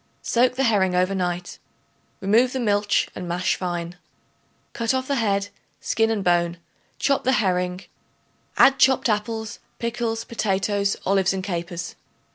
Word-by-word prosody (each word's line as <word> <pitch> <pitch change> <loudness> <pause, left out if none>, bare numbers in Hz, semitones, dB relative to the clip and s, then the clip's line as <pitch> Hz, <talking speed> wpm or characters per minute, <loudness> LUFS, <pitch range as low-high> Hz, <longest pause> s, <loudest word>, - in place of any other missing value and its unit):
Soak 250 +1 +2
the 270 - 0
herring 195 -6 +2
over 185 +2 +2
night; 180 -1 -3 0.6
remove 230 +6 +3
the 260 - -2
milch 205 -3 +1
and 180 - -6
mash 175 +1 0
fine. 175 -1 -4 0.8
Cut 230 +2 0
off 260 0 -2
the 280 - 0
head, 200 -3 0 0.3
skin 225 0 +1
and 215 -3 -1
bone; 175 -1 +1 0.4
chop 275 -1 +1
the 260 - +2
herring; 180 -4 0 0.8
add 270 0 +6
chopped 265 -2 +4
apples, 220 +1 -2 0.2
pickles, 230 -1 -2
potatoes, 200 -2 -1
olives 195 0 +2
and 190 -1 -3
capers. 175 -2 -4
200 Hz, 140 wpm, -23 LUFS, 180-230 Hz, 0.8 s, add